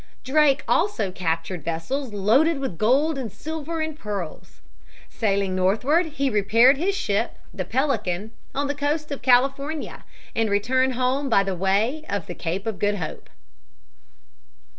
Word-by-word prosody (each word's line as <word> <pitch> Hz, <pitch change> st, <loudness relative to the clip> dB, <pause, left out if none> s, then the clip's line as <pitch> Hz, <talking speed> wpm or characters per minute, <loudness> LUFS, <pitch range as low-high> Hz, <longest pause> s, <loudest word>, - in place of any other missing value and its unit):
Drake 290 Hz, +1 st, +3 dB
also 220 Hz, -, +1 dB
captured 165 Hz, -1 st, -3 dB
vessels 215 Hz, -, -3 dB
loaded 240 Hz, +11 st, +3 dB
with 265 Hz, -12 st, -4 dB
gold 275 Hz, +7 st, +2 dB
and 235 Hz, -6 st, -5 dB
silver 320 Hz, +3 st, -5 dB
and 315 Hz, -1 st, -3 dB
pearls. 195 Hz, -, -6 dB, 0.5 s
Sailing 200 Hz, -3 st, 0 dB
northward, 245 Hz, -, +2 dB
he 280 Hz, -3 st, -1 dB
repaired 230 Hz, +4 st, +4 dB
his 380 Hz, +6 st, 0 dB
ship, 210 Hz, -, -1 dB, 0.2 s
the 185 Hz, -3 st, -4 dB
Pelican, 220 Hz, -5 st, -1 dB, 0.2 s
on 285 Hz, +1 st, 0 dB
the 285 Hz, -, -1 dB
coast 295 Hz, +1 st, -2 dB
of 280 Hz, -, -4 dB
California, 275 Hz, +4 st, +1 dB, 0.3 s
and 225 Hz, -1 st, +1 dB
returned 255 Hz, +6 st, +2 dB
home 260 Hz, +3 st, 0 dB
by 200 Hz, -4 st, +4 dB
the 195 Hz, -1 st, -2 dB
way 205 Hz, -, +1 dB
of 200 Hz, -4 st, -2 dB
the 175 Hz, -, -6 dB
Cape 180 Hz, +3 st, -4 dB
of 220 Hz, -4 st, -3 dB
Good 205 Hz, 0 st, +1 dB
Hope. 160 Hz, -, -6 dB
240 Hz, 145 wpm, -24 LUFS, 195-285 Hz, 0.5 s, repaired